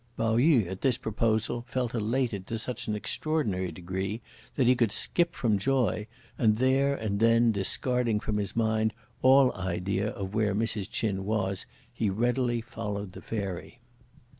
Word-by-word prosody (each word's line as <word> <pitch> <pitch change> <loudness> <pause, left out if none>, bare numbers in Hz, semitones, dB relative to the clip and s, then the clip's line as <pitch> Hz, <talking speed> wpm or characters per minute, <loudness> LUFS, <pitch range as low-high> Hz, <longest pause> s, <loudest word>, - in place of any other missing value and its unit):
Pao 115 0 +1
yü, 130 - +4
at 95 +2 -6
this 130 -3 +2
proposal, 110 +2 0
felt 125 -1 -1
elated 115 -3 -1
to 115 - -3
such 120 +2 -3
an 105 - 0
extraordinary 105 - -1
degree 95 +5 -4 0.4
that 130 - +2
he 125 +1 +5
could 120 -4 +2
skip 170 +9 +1
from 110 -5 +1
joy, 120 -3 +1 0.3
and 110 -2 +3
there 135 +3 +3
and 105 -5 -2
then 115 +1 +4
discarding 115 +3 +1
from 105 -1 -2
his 100 0 -3
mind 110 -1 +1 0.3
all 130 0 +6
idea 95 +2 -2
of 95 0 -5
where 105 -2 +1
Mrs. 110 -2 -1
Ch'in 100 -4 -1
was, 95 -2 -1 0.3
he 115 -3 0
readily 120 +3 0
followed 100 -3 -5
the - - -10
Fairy. 100 +1 -5
110 Hz, 160 wpm, -28 LUFS, 100-120 Hz, 0.4 s, all